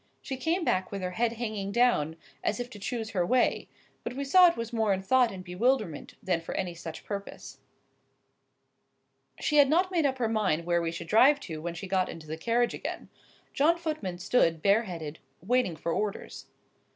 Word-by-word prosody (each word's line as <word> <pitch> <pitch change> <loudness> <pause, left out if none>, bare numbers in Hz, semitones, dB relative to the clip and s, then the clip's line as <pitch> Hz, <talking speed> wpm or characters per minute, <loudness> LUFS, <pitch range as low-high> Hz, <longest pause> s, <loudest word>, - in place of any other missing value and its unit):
She 270 - -5
came 330 +7 -1
back 185 - 0
with 195 -2 -4
her 180 - -2
head 230 +4 0
hanging 215 -4 -4
down, 200 -10 +2 0.3
as 210 - 0
if 245 +1 -5
to 210 - -10
choose 225 +2 -4
her 185 -3 +1
way,—but 245 +2 -1
we 280 - -3
saw 360 +6 +7
it 340 - 0
was 230 +1 -5
more 220 -3 +1
in 190 0 -3
thought 245 +3 +3
and 185 -1 -8
bewilderment 190 - -1
than 180 -3 0
for 165 - -6
any 180 -2 -2
such 165 -1 -8
purpose. 200 -1 -7 1.8
She 300 - +1
had 285 -2 +7
not 360 +5 +2
made 330 -5 +2
up 265 -1 -2
her 240 -3 0
mind 195 -7 0
where 170 0 +2
we 165 -1 -1
should 170 - -6
drive 260 - +5
to 160 -3 -6
when 170 +1 -4
she 180 +4 -6
got 185 -1 +1
into 165 -2 -9
the 155 +1 -5
carriage 235 +8 +1
again. - - -6 0.4
John 315 +4 +3
Footman 305 - -4
stood, 175 -4 +1
bare 205 +4 +4
headed, 160 -5 -6 0.2
waiting 230 -2 +1
for 165 +2 -3
orders. 210 +2 -4
210 Hz, 195 wpm, -28 LUFS, 175-255 Hz, 1.8 s, saw